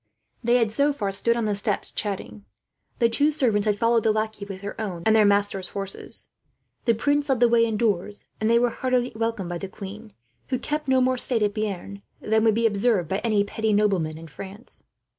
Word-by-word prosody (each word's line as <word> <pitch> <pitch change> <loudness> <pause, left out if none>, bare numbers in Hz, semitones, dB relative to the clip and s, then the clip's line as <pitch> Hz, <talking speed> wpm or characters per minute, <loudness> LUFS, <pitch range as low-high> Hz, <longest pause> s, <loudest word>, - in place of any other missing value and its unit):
They 240 +1 +3
had 230 -3 +2
so 280 +6 +2
far 205 -8 -2
stood 235 +4 +2
on 230 - 0
the 210 - +1
steps, 205 0 -1
chatting. 185 - -5 0.5
The 235 - +4
two 285 +6 +3
servants 230 -9 +1
had 205 -1 +2
followed 230 +1 +3
the 220 - +2
lackey, 215 -1 -2
with 195 -1 -8
their 205 +2 -6
own 180 -6 -4
and 220 0 +5
their 215 -2 +5
masters' 200 -2 +1
horses. 195 -1 -6 0.5
The 230 -2 +3
prince 285 +5 0
led 265 -3 +2
the 240 - +6
way 230 0 +4
indoors, 210 -3 -1
and 220 - +1
they 235 - +5
were 240 0 +2
heartily 255 0 0
welcomed 225 -5 -2
by 175 -1 -4
the 195 - -5
queen, 210 +3 -9 0.3
who 255 - -1
kept 300 +3 -3
no 260 -1 +3
more 255 0 +1
state 235 -4 +2
at 205 -1 +1
Bearn 200 -2 -4 0.2
than 220 0 +1
would 220 -2 +4
be 230 0 +1
observed 205 -5 +1
by 190 - 0
any 215 -3 +2
petty 220 +1 -1
nobleman 190 -7 +1
in 165 - -10
France. 195 +8 -10
215 Hz, 215 wpm, -24 LUFS, 200-235 Hz, 0.5 s, the